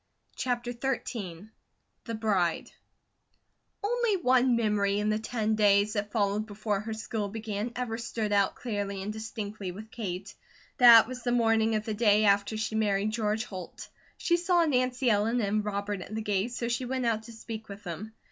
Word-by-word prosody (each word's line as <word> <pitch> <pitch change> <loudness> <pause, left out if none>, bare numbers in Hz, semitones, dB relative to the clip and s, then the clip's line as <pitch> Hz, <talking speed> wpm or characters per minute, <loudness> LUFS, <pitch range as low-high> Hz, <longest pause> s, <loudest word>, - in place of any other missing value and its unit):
CHAPTER 245 -1 -2
XIII 225 -7 -4 0.6
THE 230 - -4
BRIDE 195 -7 0 1.1
ONLY 470 -1 +1
one 255 -5 +3
memory 210 -3 +1
in 210 +1 0
the 215 - 0
ten 220 -1 -1
days 205 -1 +4
that 205 -1 -2
followed 210 -1 0
before 210 -1 -2
her 220 +2 -5
school 220 -1 -3
began 215 +1 -4
ever 240 -2 -3
stood 225 -2 -3
out 200 -1 +2
clearly 200 -4 -3
and 210 +2 -4
distinctly 215 -3 -5
with 215 +4 -10
Kate. 195 -4 -5 0.5
That 235 -3 +9
was 255 0 -7
the 245 - -1
morning 225 -2 +3
of 215 0 -1
the 220 - -2
day 210 -1 +4
after 200 +2 +2
she 220 0 -2
married 210 -1 +1
George 215 -1 0
Holt. 185 -3 -8 0.3
She 345 - +2
saw 350 -1 +3
Nancy 255 -3 +1
Ellen 225 +2 +2
and 210 -1 0
Robert 200 -1 -3
at 215 - -7
the 220 - -3
gate 205 +2 0
so 240 -1 -2
she 235 +2 -1
went 255 0 -2
out 225 -2 +1
to - - -8
speak 225 -1 -8
with 200 +1 -9
them. 205 +5 -7
220 Hz, 175 wpm, -29 LUFS, 205-235 Hz, 1.1 s, That